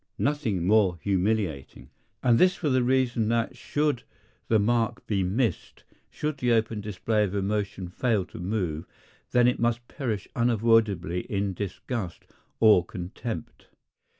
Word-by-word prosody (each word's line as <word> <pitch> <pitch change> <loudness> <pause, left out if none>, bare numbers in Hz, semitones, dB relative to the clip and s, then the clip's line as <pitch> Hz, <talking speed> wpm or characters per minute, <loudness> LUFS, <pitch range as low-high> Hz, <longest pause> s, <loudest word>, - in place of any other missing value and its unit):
Nothing 120 - 0
more 100 -3 +4
humiliating! 95 -7 -1 0.3
And 120 -2 +4
this 185 0 +5
for 155 - -1
the 130 -1 +3
reason 120 -3 +1
that 115 -1 0
should 145 -4 -1 0.5
the 110 - +4
mark 115 +1 +1
be 100 -3 0
missed, 100 +2 -1 0.3
should 150 -2 -3
the 125 -2 +2
open 110 -1 0
display 105 +1 0
of 100 -1 -2
emotion 100 -1 -2
fail 105 +1 0
to - - -11
move, 90 -4 -2 0.4
then 125 0 +4
it 125 - +1
must 120 0 0
perish 115 -9 -3
unavoidably 110 -7 +2
in 100 -1 0
disgust 100 +1 -5 0.3
or 105 -6 +6
contempt. 90 +2 -7
110 Hz, 135 wpm, -27 LUFS, 95-120 Hz, 0.5 s, or